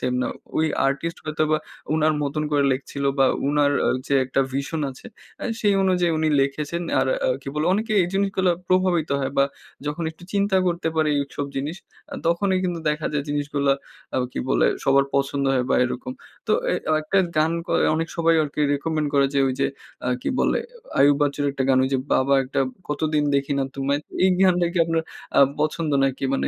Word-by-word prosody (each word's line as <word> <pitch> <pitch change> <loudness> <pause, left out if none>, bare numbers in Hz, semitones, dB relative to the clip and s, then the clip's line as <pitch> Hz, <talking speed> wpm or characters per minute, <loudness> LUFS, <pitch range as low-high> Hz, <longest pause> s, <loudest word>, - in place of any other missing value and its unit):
Same 125 - -1
না। - - -1 0.3
ওই 160 - +3 0.2
artist 140 +5 -2
হয়তোবা 155 0 0 0.4
উনার 155 0 +2
মতন 145 +2 -2
করে 145 -1 +2
লিখছিল, 140 +1 -4
বা 135 - +5 0.2
উনার 145 0 +3 0.3
যে 140 - 0
একটা 130 +1 0
ভিশন 140 +4 -2
আছে। 130 - -13 0.4
আ - - -3 0.2
সেই 205 -2 +3
অনুযায়ী 180 -3 +2
উনি 155 0 +1
লিখেছেন 150 +5 -2 0.2
আর - - +1 0.2
আ - - +2
কি - - -7
বলে? 150 +2 0
অনেকে 215 +3 -1
এই 175 - 0
জিনিসগুলা 195 -2 +1 0.2
প্রভাবিত 185 -3 +2
হয়, 135 - -1
বা 140 - +6 0.4
যখন 150 +3 -2
একটু 160 - -18
চিন্তা 200 -1 +2
করতে 170 -2 0
পারে 155 -1 +2
এইসব 140 0 -3
জিনিস। 145 +5 -3 0.4
আ - - -4
তখনই 185 +3 +2
কিন্তু 175 -2 -2
দেখা 150 +1 -2
যায় 145 -2 -1
জিনিসগুলা 145 -1 0 0.4
আ - - +1 0.2
কি - - -5
বলে? - - +3 0.2
সবার 135 0 +4
পছন্দ 140 0 0
হয়, 125 -1 +1
বা - - +4
এরকম। 255 - -4 0.3
তো - - +2 0.2
এ - - +2 0.3
একটা 175 +6 +1 0.2
গান 155 +1 +3
ক - - -26 0.3
অনেক 165 +1 -1
সবাই 165 0 +3
আরকি 150 0 -4
রিকমেন্ড 155 +1 -1
করে 140 -1 +4
যে, - - +3
ঐ - - +2
যে 135 - +3 0.4
আ - - +1
কি - - -1
বলে? - - +2 0.4
আয়ুব 145 0 +6
বাচ্চুর 145 0 0
একটা 135 - -2
গান 130 -1 +4
ঐ - - +3
যে, 135 - +2
'বাবা 135 +1 +3
একটা 130 +1 -2 0.3
কতদিন 150 0 0
দেখি 140 0 0
না 135 - +1
তোমায়।' 140 +1 0 0.2
এই 190 - +5
গানটা 180 -2 +4
কি 180 - -1
আপনার 165 0 0 0.4
আ - - +8 0.2
পছন্দ 155 +1 0
নাকি? 135 0 -1
মানে 135 - 0
150 Hz, 195 wpm, -23 LUFS, 140-170 Hz, 0.4 s, আ